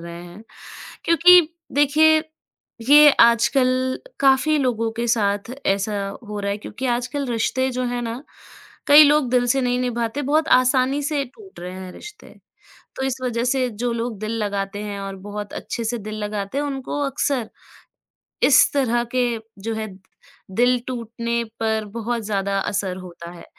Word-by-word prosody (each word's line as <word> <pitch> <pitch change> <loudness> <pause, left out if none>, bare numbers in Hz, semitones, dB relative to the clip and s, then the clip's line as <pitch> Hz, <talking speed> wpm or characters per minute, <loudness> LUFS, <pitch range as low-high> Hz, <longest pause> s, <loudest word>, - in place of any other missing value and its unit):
रहे 170 0 -9
हैं 175 +4 -12 0.6
क्योंकि 355 +2 +7 0.3
देखिए, 310 +2 +4 0.7
ये 295 0 +9
आजकल 255 +2 +3 0.2
काफ़ी 275 +3 +3
लोगों 230 -4 0
के 235 +1 -3
साथ 205 -1 0 0.2
ऐसा 200 +1 0 0.3
हो 210 -1 -5
रहा 200 0 -2
है, 200 - -3
क्योंकि 230 +5 -6
आजकल 270 +3 -4
रिश्ते 260 +2 -1
जो 255 0 -3
हैं 245 0 -3
ना 235 +3 -5 0.7
कई 295 +1 +9
लोग 295 -3 +3
दिल 245 -1 +2
से 270 +2 +2
नहीं 245 0 0
निभाते, 240 +2 -2
बहुत 305 +3 +1
आसानी 255 +2 +1
से 290 -1 -1
टूट 380 - -15
रहे 180 +1 -7
हैं 185 -1 -8
रिश्ते, 420 - -13 0.6
तो - - -4
इस 265 -1 -2
वज़ह 235 -2 -1
से 255 0 0
जो 240 +2 -3
लोग 230 -1 -3
दिल 215 +1 -4
लगाते 200 0 -3
हैं 205 -1 -5
और 195 0 -6
बहुत 205 0 -6
अच्छे 235 - -5
से 240 +2 -1
दिल 215 0 -7
लगाते 205 +3 -4
हैं 290 - -1
उनको 275 0 -4
अक्सर 270 -4 -1 1.0
इस 265 - +5
तरह 240 -4 +1
के 250 -1 +2 0.3
जो 225 +2 -3
है 220 0 -4 0.6
दिल 245 +5 +2
टूटने 235 -1 -3 0.2
पर 220 -1 0
बहुत 235 0 -3
ज़्यादा 200 -1 -1
असर 190 -1 -2
होता 170 -2 -10
है, 175 - -12
240 Hz, 165 wpm, -21 LUFS, 210-265 Hz, 1.0 s, ये